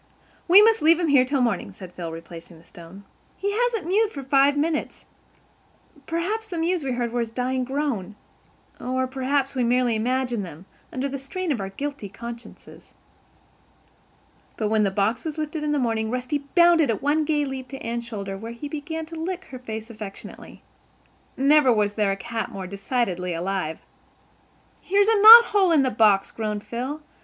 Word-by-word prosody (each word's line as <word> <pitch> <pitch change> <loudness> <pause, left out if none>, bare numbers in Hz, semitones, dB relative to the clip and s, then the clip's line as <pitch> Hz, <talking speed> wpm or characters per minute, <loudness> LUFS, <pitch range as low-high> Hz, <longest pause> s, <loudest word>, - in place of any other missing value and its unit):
"We 380 +4 +8
must 450 0 +4
leave 330 +2 +5
him 340 -3 0
here 270 -3 +5
till 275 0 0
morning," 225 -5 -1
said 185 -2 -12
Phil, 170 -2 -6
replacing 165 +1 -11
the 165 - -20
stone. 175 +4 -13 0.3
"He 405 - -2
hasn't 455 -3 -1
mewed 415 +5 +2
for 280 -9 -8
five 275 +2 +3
minutes. 305 +1 -2 1.0
Perhaps 395 +7 -2
the 355 - -6
mews 335 0 0
we 265 -2 -2
heard 240 -1 -2
were 245 - -2
his 230 -1 -2
dying 255 +2 -2
groan. 255 -7 -3 0.6
Or 260 +1 -1
perhaps 270 +1 -1
we 255 -2 0
merely 245 -1 +2
imagined 245 0 -1
them, 170 0 -10 0.3
under 260 +2 -2
the 275 0 -5
strain 365 +5 -4
of 240 -8 -1
our 195 - -4
guilty 275 0 -6
consciences." 235 +3 -11 1.6
But, 215 -2 -1
when 220 0 +2
the 205 - +2
box 205 +4 -1
was 315 -1 -5
lifted 305 0 -4
in 300 - -1
the 295 - +1
morning, 225 -4 -1
Rusty 255 +4 -2 0.2
bounded 340 -4 +5
at 220 - -2
one 300 +2 +2
gay 295 -1 0
leap 265 -1 -6
to 270 - -8
Anne's 235 +1 -3
shoulder 200 -4 -5
where 225 +4 -7
he 265 +5 -7
began 320 +2 -5
to 330 +1 -10
lick 360 +3 -4
her 255 - -8
face 220 -2 -7
affectionately. 210 -3 -10 0.7
Never 275 0 +4
was 210 -2 +1
there 210 -1 0
a 195 - -3
cat 225 +3 -4
more 195 -1 -7
decidedly 195 -3 -2
alive. 175 -2 -3 1.0
"Here's 400 +2 +2
a 445 -2 +3
knot 460 +2 +11
hole 390 -4 +3
in 305 -4 +4
the 260 - 0
box," 205 -3 +3
groaned 210 -2 -4
Phil. 265 +6 -5
255 Hz, 185 wpm, -24 LUFS, 215-305 Hz, 1.6 s, knot